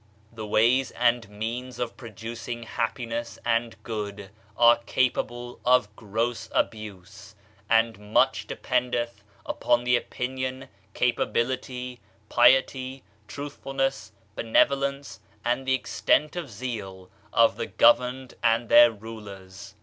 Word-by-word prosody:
The 110 -2 -6
ways 120 +5 +3
and 120 -2 +1
means 115 +5 -5
of 120 -1 -3
producing 115 +1 -7
happiness 115 0 -3
and 115 0 0
good 105 -3 -5 0.3
are 120 0 +7
capable 120 0 -1
of 125 -4 +3
gross 115 +3 -3
abuse; 105 0 -4 0.3
and 115 -2 +1
much - - +3
dependth 120 -3 -2 0.2
upon 120 0 +1
the 125 0 +3
opinion, 130 +2 -3 0.3
capability, 125 +1 -1 0.3
piety, 130 +1 +3 0.2
truthfulness, 135 -2 -3 0.2
benevolence, 140 +4 +1 0.3
and 125 +2 0
the 130 - +4
extent 150 +3 +1
of 170 -6 -4
zeal 100 -5 -6 0.2
of 115 0 +4
the - - -3
governed 125 +2 +3
and 115 0 +2
their 120 0 +9
rulers. 100 -3 -10
120 Hz, 105 wpm, -26 LUFS, 110-125 Hz, 0.3 s, their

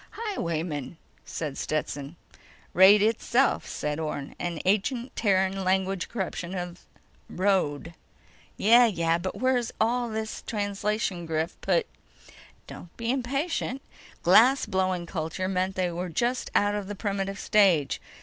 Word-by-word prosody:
"Highwaymen," 170 - -4 0.3
said 150 -4 -5
Stetson. 145 0 -3 0.6
"Raid 200 +3 +7
itself," 235 +4 +1
said 150 +1 -3
Orne. 150 -3 -4
"An 170 -2 -3
ancient 235 +6 0
Terran 190 -2 +1
language 190 0 0
corruption 190 -4 -4
of 175 -1 -6 0.4
road." 175 -5 0 0.6
"Yeah, 235 +3 +6
yeah. 170 -5 +1
But 185 +2 -4
where'd 255 -2 +1
all 240 +1 +1
this 220 0 -4
translation 205 -3 -2
griff 160 +1 -2
put—" - - +1 0.8
"Don't 175 - -12
be 230 0 -1
impatient. 275 +1 -2 0.4
Glass 235 +10 +6
blowing 185 -2 -1
culture 170 +2 -3
meant 190 0 -1
they 180 -2 0
were 175 +1 -4
just 240 +9 -1
out 205 0 +3
of 205 -2 -3
the 205 - -5
primitive 195 -1 -3
stage. 185 -9 +3
190 Hz, 125 wpm, -27 LUFS, 170-220 Hz, 0.8 s, Raid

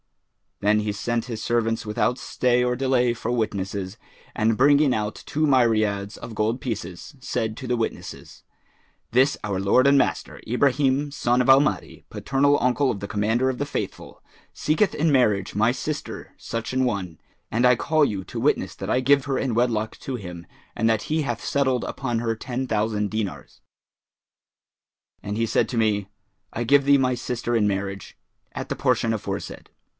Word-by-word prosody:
Then 105 +1 +3
he 105 0 -2
sent 115 +3 -2
his 115 -3 -5
servants 115 -1 0
without 115 +4 0
stay 125 0 +1
or 125 0 +1
delay 125 -2 +2
for 120 0 -4
witnesses 100 -4 -2 0.4
and 110 0 +1
bringing 145 0 +5
out 105 0 -3
two 155 +1 +1
myriads[FN#411] 110 -5 +2
of 110 - -8
gold 110 +4 0
pieces, 105 - -6
said 115 -3 -3
to 130 - -7
the 120 0 0
witnesses, 115 - -5 0.7
'This 130 +4 +3
our 100 -2 -2
lord 115 +7 +4
and 140 0 +5
master, - - -1
Ibrahim 135 +3 +2
son 125 -3 +1
of 125 - 0
Al 135 0 +9
Mahdi, 145 - -2
paternal 140 +1 +2
uncle 125 +2 +2
of 105 - -5
the 100 - -5
Commander 110 +5 +1
of 130 - -3
the 145 - 0
Faithful, 145 - -6 0.3
seeketh 160 +7 +1
in 155 +1 +1
marriage 105 -8 +2
my 110 +3 +3
sister 150 +3 -5
such 115 +2 -5
an 130 0 +2
one; 95 - -2 0.3
and 120 +3 +2
I 125 0 +6
call 155 +5 +2
you 100 -7 -3
to - - -6
witness - - 0
that - - -6
I 125 - +2
give 140 +1 +3
her 135 -2 -1
in 130 -4 -1
wedlock 115 -2 0
to 135 - -4
him 90 -6 -8 0.3
and 115 -1 +1
that 110 -2 +1
he 155 0 -1
hath 120 -4 -3
settled 130 -3 +1
upon 120 -4 -2
her 115 -1 -1
ten 130 +3 -4
thousand 105 -2 0
dinars.' 110 -3 -5 1.6
And 105 +1 -4
he 115 - +1
said - - +1
to 120 - -3
me, 105 -3 +1 0.5
'I 120 - -2
give 140 +3 +4
thee 140 0 +6
my 130 -1 +1
sister 120 0 -3
in 105 -2 +3
marriage, 100 -1 -3 0.4
at - - -6
the - - -2
portion 115 -1 +1
aforesaid.' 110 - -5
120 Hz, 180 wpm, -24 LUFS, 105-130 Hz, 1.6 s, Al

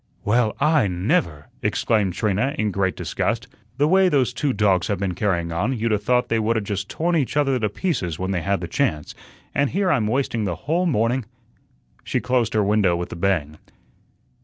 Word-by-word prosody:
"Well, 110 +1 +2
I 150 -5 +3
NEVER!" 90 - -1
exclaimed 105 -5 +1
Trina 110 - 0
in 105 -1 0
great 95 -1 0
disgust. 120 +1 -2 0.3
"The 145 +2 +3
way 190 +2 +4
those 130 -6 +1
two 140 +2 0
dogs 100 -6 +2
have 100 - -1
been 95 -1 -2
carrying 85 -4 -1
on 105 +10 -1
you'd 115 +1 -1
'a' 105 - +2
thought 125 +4 +1
they 115 - +1
would 110 +1 +1
'a' - - 0
just 100 -1 -4
torn 170 +2 0
each 145 -2 0
other 135 -3 +2
to 105 -2 0
pieces 100 - -2
when 95 +1 -3
they 90 -3 -1
had 100 +2 -1
the 85 - -4
chance, 85 - -1 0.4
and 140 -1 +1
here 190 0 +1
I'm 115 -9 +1
wasting 120 -2 0
the 90 -3 -2
whole 170 +5 +1
morning 120 -3 +1 0.4
" - - -41 0.3
she - - -1
closed 125 -3 0
her 105 - +3
window 100 -3 +2
with 85 0 -4
a - - -5
bang. 85 -5 -1
110 Hz, 205 wpm, -22 LUFS, 95-135 Hz, 0.4 s, way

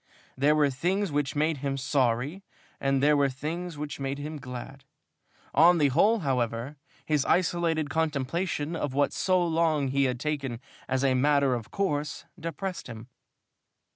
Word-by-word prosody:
There 145 +3 +3
were 145 -2 +3
things 180 +7 -1
which 145 -1 -1
made 155 +1 +1
him 135 0 -2
sorry 135 +4 0 0.4
and 135 0 +1
there 150 +1 +5
were 140 -1 +3
things 160 +5 -5
which 145 0 -5
made 135 0 -2
him 150 +1 -6
glad. 135 +1 -8 0.7
On 170 +4 +6
the 145 -3 +3
whole, 205 - +3
however, 125 -1 -1 0.3
his 150 -3 +1
isolated 165 -4 +1
contemplation 160 +1 -1
of 145 -4 -3
what 145 0 +2
for - - -5
so 185 -2 +2
long 160 -4 +1
he 140 +1 +2
had 125 -2 -1
taken 135 -5 -3 0.3
as 130 0 0
a 135 -1 +3
matter 140 0 +3
of 120 -2 -4
course 150 -3 -2
depressed 180 +3 -5
him. 115 0 -9
145 Hz, 160 wpm, -28 LUFS, 135-160 Hz, 0.7 s, On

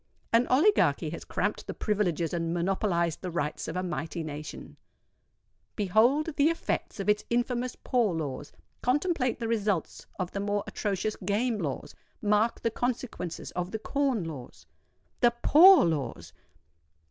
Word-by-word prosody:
An 235 +2 +4
oligarchy 325 +12 +3
has - - -6
cramped - - -2
the - - -5
privileges 180 -6 0
and 165 0 -1
monopolised 175 -2 0
the 185 - -4
rights 150 -3 -3
of 160 - -5
a 185 - -1
mighty 165 -1 -4
nation. 150 0 -8 1.0
Behold 240 - +2
the 290 +2 +5
effects 330 -8 -3
of 195 - -3
its 210 0 +2
infamous 245 +1 -1
Poor 230 -8 +1
Laws;—contemplate 250 - -2
the 230 - -3
results 205 -6 -1
of 185 -2 -3
the 200 - -4
more 205 0 -1
atrocious 205 +1 -2
Game 210 +4 0
Laws;—mark 210 - -2
the 230 - 0
consequences 240 -8 -3
of 180 0 -3
the 220 - -3
Corn 265 -2 0
Laws. 135 - -9 0.5
THE 240 -1 +4
POOR 365 - +8
LAWS! 130 - -3
205 Hz, 135 wpm, -28 LUFS, 170-245 Hz, 1.0 s, POOR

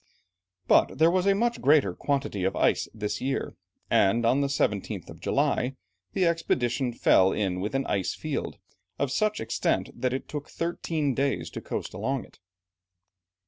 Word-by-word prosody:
But - - +4
there 160 +1 +5
was 185 +1 +1
a 195 - +5
much 235 +3 0
greater 140 - +4
quantity 135 -6 -2
of 95 +1 0
ice - - +2
this 105 -1 -4
year, 135 +1 -2 0.3
and 115 +5 +3
on 130 +4 +3
the 140 - +1
17th 105 -8 -1
of - - -12
July, 130 +2 0 0.4
the 185 - +2
expedition 130 -7 0
fell 95 -4 +4
in 95 -3 -1
with 105 +7 -3
an 135 - +1
"icefield" 120 - -2 0.4
of 140 -2 -1
such 215 +8 +1
extent 110 - -1
that 130 - -1
it 130 - -4
took 150 0 -6
thirteen 165 -4 -2
days 135 +2 -1
to - - -6
coast - - -5
along 135 -1 -2
it. - - -22
135 Hz, 160 wpm, -27 LUFS, 110-155 Hz, 0.4 s, there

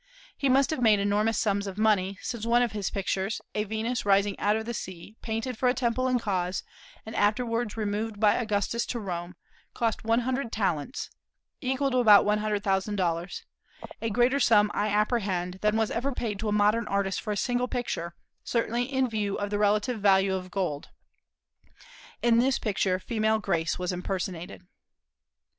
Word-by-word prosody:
He 275 - 0
must 270 +3 +4
have 310 - -2
made 215 -3 +5
enormous 205 +3 +1
sums 200 -2 0
of 195 0 -6
money, 200 -3 +2
since 235 -4 -4
one 235 +1 +3
of 240 - -1
his 205 -2 -2
pictures 195 +1 -2
a 210 0 -1
Venus 220 +3 -2
rising 200 0 +3
out 210 +1 +2
of 220 0 -3
the 235 - -4
sea, 190 0 -7
painted 225 +2 -3
for 250 - +3
a 250 - +1
temple 255 +1 0
in 255 -1 +2
Cos, 185 -5 -2 0.4
and 220 - -7
afterwards 230 +1 0
removed 210 0 -2
by 210 -1 +5
Augustus 225 0 -1
to 240 - -3
Rome 180 -3 -5 0.4
cost 230 -2 -1
one 230 +2 +2
hundred 255 0 -2
talents 195 - -2 0.5
(equal 265 0 0
to 255 - +2
about 210 -4 +7
one 210 0 +2
hundred 210 -1 -1
thousand 195 +1 0
dollars), 175 -1 -2 0.6
a 225 - -1
greater 245 +5 +2
sum, 210 -5 +4
I 210 - 0
apprehend, 200 -4 0
than 210 +1 +2
was 220 -1 +1
ever 250 +5 -1
paid 220 -6 -3
to 215 0 -2
a - - 0
modern 210 +2 +2
artist 195 -1 -1
for 215 - -4
a 205 - -1
single 245 +3 0
picture, 175 -9 -3 0.3
certainly 235 +1 0
in 265 -1 +2
view 210 -3 -2
of 205 0 -3
the 205 - 0
relative 210 +2 +1
value 195 -1 +4
of 185 -1 -4
gold. 175 -7 -3 1.3
In 235 -1 +4
this 260 +1 +3
picture 195 -3 0
female 220 +2 0
grace 170 -6 -1
was 180 0 -2
impersonated. 180 -1 -4
210 Hz, 180 wpm, -27 LUFS, 195-235 Hz, 1.3 s, about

